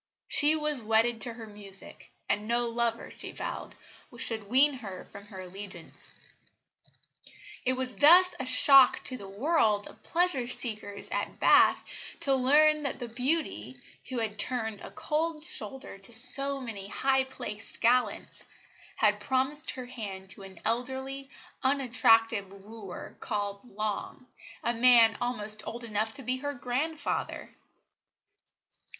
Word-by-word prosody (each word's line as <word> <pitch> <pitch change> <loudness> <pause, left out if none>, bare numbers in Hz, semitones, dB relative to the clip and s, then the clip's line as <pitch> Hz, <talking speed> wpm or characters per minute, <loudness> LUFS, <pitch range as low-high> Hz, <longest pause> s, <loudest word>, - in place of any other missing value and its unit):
She 300 +1 +5
was 300 -4 -2
wedded 225 +1 +2
to 235 - -2
her 225 -1 -9
music, 205 -2 -6 0.2
and 210 +1 -1
no 240 +1 +1
lover, 230 0 -2
she - - -8
vowed, - - -7 0.4
should 220 -3 -3
wean 275 +5 +5
her 195 -6 -9
from 200 0 -12
her 190 -3 -10
allegiance. 185 -2 -10 1.5
It 255 - +1
was 255 0 -4
thus 355 +5 +8
a - - -3
shock 260 0 +5
to 255 - 0
the 200 -6 -9
world 215 -2 +1
of - - -15
pleasure 335 -8 0
seekers 220 -5 -4
at - - -4
Bath - - +4 0.4
to 275 - +2
learn 300 +4 +4
that 280 -3 -3
the 245 -2 -7
beauty, 240 - -2 0.3
who 255 - -4
had 220 -2 -4
turned 225 -4 -2
a - - -9
cold 315 0 -2
shoulder 260 - -1
to 195 +4 -8
so 275 +4 +7
many 220 -6 -7
high 265 +5 +1
placed 215 -5 -2
gallants, 245 +2 0 0.5
had 210 -1 +2
promised 265 +7 0
her 255 -1 -2
hand 200 -6 -7
to 195 - -11
an 190 -2 -13
elderly, 265 +4 -3 0.3
unattractive 230 -6 +2
wooer 200 -1 -11
called 205 -2 -4 0.2
Long, 215 +3 -4 0.4
a 235 - 0
man 235 -2 +5
almost 215 -3 -1
old 235 +1 -5
enough 220 0 -2
to 275 - -9
be 255 +1 -1
her 285 +2 -5
grandfather. 275 +6 -4
240 Hz, 140 wpm, -28 LUFS, 210-265 Hz, 1.5 s, thus